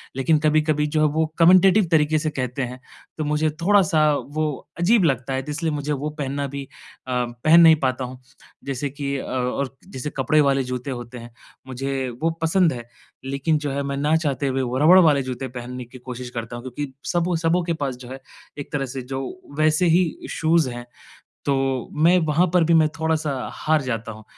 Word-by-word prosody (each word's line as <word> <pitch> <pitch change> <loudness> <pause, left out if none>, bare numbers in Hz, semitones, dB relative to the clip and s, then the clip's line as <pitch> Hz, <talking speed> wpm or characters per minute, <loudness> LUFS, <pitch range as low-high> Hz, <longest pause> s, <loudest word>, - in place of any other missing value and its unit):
लेकिन 150 +4 +2
कभी-कभी 155 -1 +2
जो 155 +1 -1
है 155 - +5
वो 160 0 +2
कमेंटेटिव 185 +3 +6
तरीक़े 155 -1 +3
से 155 0 -1
कहते 135 -1 -3
हैं। 125 +1 -6 0.4
तो 155 - -2
मुझे 150 +1 +1
थोड़ा-सा 170 -6 +4
वो 155 +2 -3 0.3
अजीब 200 +3 +4
लगता 135 -2 0
है, 130 - -1
तो 150 - -6
इसलिए 160 +1 -2
मुझे 150 0 -3
वो 145 +2 -3
पहनना 140 0 -2
भी 140 0 -6 0.4
अ, 125 -1 0 0.2
पहन 165 +2 +7
नहीं 160 -1 +8
पाता 130 0 0
हूँ। 125 0 -9 0.5
जैसे 140 +1 -3
कि 140 0 -4
अ, - - -5
और 130 +1 -2
जैसे 135 -4 -5
कपड़े 150 +3 +3
वाले 135 -1 +2
जूते 125 +2 -4
होते 120 0 -7
हैं, 120 0 -10 0.4
मुझे 135 0 -3
वो 165 - +2
पसंद 165 -1 +3
है, 120 -1 -7 0.4
लेकिन 140 +3 0
जो 145 -2 -3
है 140 +1 -2
मैं 140 0 -3
ना 150 +3 +2
चाहते 145 -3 -1
हुए 135 0 0
वो 125 0 -2
रबर 160 +6 +7
वाले 145 -4 +4
जूते 130 +1 -5
पहनने 125 0 -7
की 125 +2 -13
कोशिश 125 0 -7
करता 120 0 -6
हूँ, 120 - -8
क्योंकि 130 +2 -5 0.2
सबों, 175 0 0
सबों 165 +2 +1
के 170 -1 -1
पास 140 -5 -3
जो 125 0 -11
है, 135 +1 -7 0.4
एक 145 - -7
तरह 135 -2 -1
से 130 - -3
जो 135 +2 -5 0.4
वैसे 155 +3 +3
ही 170 0 +3 0.2
शूज़ 160 -4 +2
हैं। 120 0 -7 0.6
तो 140 - +1 0.5
मैं 180 +2 +6
वहाँ 160 +4 +3
पर 175 -2 +5
भी 165 +1 +3
मैं 155 - +3
थोड़ा-सा 160 -2 0 0.2
हार 155 -1 +1
जाता 115 -3 -4
हूँ। 110 0 -13
145 Hz, 205 wpm, -22 LUFS, 130-160 Hz, 0.6 s, नहीं